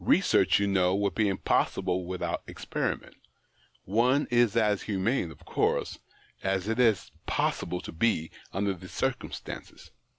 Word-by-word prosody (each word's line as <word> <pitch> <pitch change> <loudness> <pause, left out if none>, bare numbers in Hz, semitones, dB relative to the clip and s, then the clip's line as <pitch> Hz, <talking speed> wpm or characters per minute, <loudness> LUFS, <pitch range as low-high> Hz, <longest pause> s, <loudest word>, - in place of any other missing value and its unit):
Research, - - +4
you 100 - +2
know, 95 -2 +2
would 100 0 0
be 110 -2 +2
impossible 95 -1 0
without 90 0 -2
experiment; - - -3 0.7
one 125 +8 +2
is 120 -2 +3
as 105 -3 +3
humane, 100 0 0
of 75 - -14
course, - - 0 0.4
as 95 0 -1
it 115 +2 -1
is 110 -6 +3 0.2
possible 90 - -1
to - - -7
be 80 -3 +1 0.2
under 100 +1 0
the 90 0 -11
circumstances. 130 -2 -4
100 Hz, 135 wpm, -28 LUFS, 95-115 Hz, 0.7 s, Research